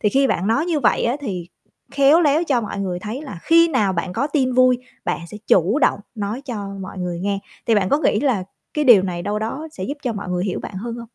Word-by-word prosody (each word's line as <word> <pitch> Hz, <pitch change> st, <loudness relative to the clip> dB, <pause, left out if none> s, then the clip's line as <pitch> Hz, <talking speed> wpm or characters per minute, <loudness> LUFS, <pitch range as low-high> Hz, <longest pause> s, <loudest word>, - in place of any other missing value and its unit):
Thì 210 Hz, -, +3 dB
khi 270 Hz, +5 st, +3 dB
bạn 185 Hz, -6 st, 0 dB
nói 275 Hz, +9 st, +1 dB
như 325 Hz, -4 st, 0 dB
vậy 240 Hz, -, +2 dB
á 240 Hz, +3 st, +1 dB
thì 185 Hz, -10 st, -5 dB, 0.4 s
khéo 280 Hz, +4 st, +5 dB
léo 310 Hz, +1 st, +3 dB
cho 270 Hz, -7 st, +1 dB
mọi 210 Hz, -2 st, -5 dB
người 185 Hz, -2 st, -2 dB
thấy 215 Hz, +9 st, -6 dB
là 265 Hz, -, -8 dB
khi 335 Hz, +1 st, +5 dB
nào 215 Hz, -11 st, +1 dB
bạn 180 Hz, 0 st, -3 dB
có 275 Hz, -, 0 dB
tin 275 Hz, -4 st, 0 dB
vui, 255 Hz, 0 st, +5 dB, 0.3 s
bạn -, -, -1 dB
sẽ -, -, -8 dB
chủ 190 Hz, -, +3 dB
động -, -, +2 dB
nói 215 Hz, +4 st, -4 dB
cho 215 Hz, -7 st, -5 dB
mọi 190 Hz, 0 st, -8 dB
người 180 Hz, -1 st, -3 dB
nghe. 200 Hz, +1 st, -1 dB, 0.3 s
Thì 230 Hz, -, +4 dB
bạn 195 Hz, -3 st, +2 dB
có 285 Hz, -, +3 dB
nghĩ -, -, +2 dB
là 255 Hz, -9 st, +1 dB, 0.3 s
cái 300 Hz, -, +1 dB
điều 235 Hz, -8 st, +7 dB
này 175 Hz, -2 st, -3 dB
đâu 210 Hz, +3 st, -2 dB
đó 265 Hz, +9 st, -4 dB
sẽ 185 Hz, -, -6 dB
giúp 285 Hz, +7 st, -4 dB
cho 245 Hz, -, -1 dB
mọi 200 Hz, -3 st, -6 dB
người 180 Hz, 0 st, -1 dB
hiểu 190 Hz, -, -2 dB
bạn -, -, -8 dB
hơn 230 Hz, +4 st, -5 dB
hông? 235 Hz, 0 st, -8 dB
225 Hz, 265 wpm, -21 LUFS, 195-275 Hz, 0.4 s, điều